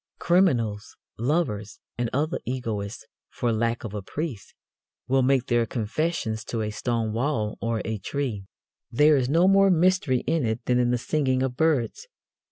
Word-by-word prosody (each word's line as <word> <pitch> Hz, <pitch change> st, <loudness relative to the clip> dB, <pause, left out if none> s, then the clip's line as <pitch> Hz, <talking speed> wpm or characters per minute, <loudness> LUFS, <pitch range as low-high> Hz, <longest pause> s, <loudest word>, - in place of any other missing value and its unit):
Criminals, 120 Hz, -, +1 dB, 0.2 s
lovers 115 Hz, -6 st, -1 dB, 0.2 s
and 120 Hz, -1 st, -1 dB
other 150 Hz, +5 st, -1 dB
egoists, 110 Hz, -4 st, -4 dB, 0.2 s
for 120 Hz, -, -1 dB
lack 115 Hz, +1 st, -1 dB
of 110 Hz, -3 st, -6 dB
a 105 Hz, -, -4 dB
priest, 135 Hz, -, -6 dB, 0.5 s
will 135 Hz, +1 st, +3 dB
make 130 Hz, -1 st, +2 dB
their 120 Hz, -1 st, +1 dB
confessions 115 Hz, 0 st, -2 dB
to 115 Hz, -, -3 dB
a 105 Hz, -, -3 dB
stone 115 Hz, 0 st, -2 dB
wall 115 Hz, -3 st, -1 dB
or 115 Hz, -1 st, -1 dB
a 110 Hz, -1 st, -3 dB
tree. 110 Hz, -3 st, -3 dB, 0.4 s
There 150 Hz, +5 st, +5 dB
is 130 Hz, -2 st, +1 dB
no 170 Hz, +5 st, +4 dB
more 195 Hz, 0 st, +5 dB
mystery 180 Hz, -6 st, +3 dB
in 160 Hz, -2 st, 0 dB
it 110 Hz, 0 st, -2 dB
than 125 Hz, 0 st, +2 dB
in 120 Hz, -1 st, +2 dB
the 125 Hz, -, +2 dB
singing 130 Hz, +1 st, 0 dB
of 130 Hz, -2 st, -2 dB
birds. 160 Hz, -, 0 dB
125 Hz, 165 wpm, -25 LUFS, 110-150 Hz, 0.5 s, There